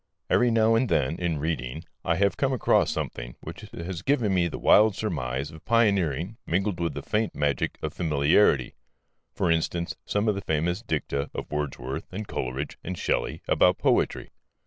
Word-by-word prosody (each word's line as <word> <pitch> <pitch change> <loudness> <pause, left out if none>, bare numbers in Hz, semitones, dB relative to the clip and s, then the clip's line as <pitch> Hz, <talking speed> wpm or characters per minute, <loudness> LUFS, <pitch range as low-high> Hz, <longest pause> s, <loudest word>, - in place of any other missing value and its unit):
Every 125 - +4
now 115 -1 +4
and 115 +1 +2
then, 70 +2 +1
in 85 -3 -1
reading, 75 -1 -3 0.2
I 85 - +1
have 100 +3 +2
come 135 -1 +1
across 125 - +3
something - - -4
which - - -8
has 85 0 -5
given 120 -7 +1
me 90 -2 +2
the 85 - -5
wild 105 -1 +5
surmise 70 - -3
of 80 -1 -13
pioneering 100 - +1
mingled 95 +1 0
with 85 -4 -1
the - - -5
faint 110 0 -1
magic 75 -3 0
of - - -2
familiarity 75 -3 +3 0.6
for 85 - +1
instance, 85 +1 -1
some 105 +2 0
of 105 - +3
the 100 - -4
famous 85 +4 -1
dicta 75 -8 -2
of - - -5
Wordsworth 70 -3 -4
and 105 +2 -5
Coleridge 65 +3 -4
and 90 0 -4
Shelley - - -1
about - - +4
poetry. - - +1
85 Hz, 170 wpm, -26 LUFS, 75-105 Hz, 0.6 s, wild